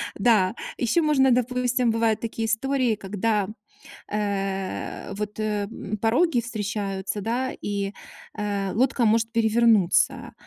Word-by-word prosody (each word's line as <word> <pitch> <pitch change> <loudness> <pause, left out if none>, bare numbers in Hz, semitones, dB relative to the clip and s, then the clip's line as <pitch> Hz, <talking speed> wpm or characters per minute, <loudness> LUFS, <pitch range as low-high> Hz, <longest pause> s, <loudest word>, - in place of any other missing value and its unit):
Да, 205 -2 +3 0.2
еще 245 +8 +2
можно, 270 -4 +4
допустим, 250 0 +1
бывают 225 -1 +1
такие 225 0 -3
истории, 250 +1 +1
когда, 205 +1 -1 0.6
э-э, 195 -2 -3
вот, 210 +1 -5
э, 210 -1 -1
мм, 215 -1 -5
пороги 245 - +2
встречаются, 205 -3 -3
да, 245 +5 -1
и, 200 -1 -2 0.4
э, 200 -2 -2
лодка 255 +1 +2
может 225 +1 +3
перевернуться. 225 -4 +3
220 Hz, 115 wpm, -25 LUFS, 205-240 Hz, 0.6 s, можно